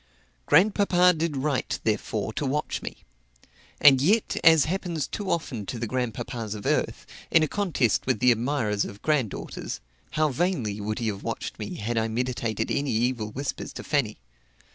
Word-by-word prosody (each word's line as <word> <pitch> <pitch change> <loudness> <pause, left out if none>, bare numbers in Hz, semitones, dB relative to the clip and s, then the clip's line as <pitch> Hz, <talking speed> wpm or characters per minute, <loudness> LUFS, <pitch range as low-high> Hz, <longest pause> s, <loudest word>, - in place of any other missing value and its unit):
Grandpapa 180 +1 +5
did 160 -2 -1
right, 135 -1 -1
therefore, 110 0 -1
to - - -3
watch 145 +2 -1
me. - - -8 0.8
And 135 -3 +7
yet, 205 +9 +2
as 160 -3 +7
happens 170 -4 -2
too 205 -3 -5
often 140 - -2
to 125 - -4
the 115 - -2
grandpapas 115 -2 -3
of 105 - -8
earth, - - 0 0.2
in 160 - +5
a - - +2
contest 165 - 0
with - - +2
the 125 +3 +5
admirers 115 -3 0
of 100 - -8
granddaughters, 140 -9 -2 0.4
how 155 0 +3
vainly 130 - -1
would 110 +1 -2
he 115 -2 -1
have 100 -2 -5
watched - - -5
me - - -5
had 115 +2 -1
I 110 - 0
meditated 120 -1 -2
any 140 0 0
evil 115 -1 0
whispers 135 +4 -4
to - - -7
Fanny! 135 -8 0
130 Hz, 165 wpm, -26 LUFS, 110-155 Hz, 0.8 s, And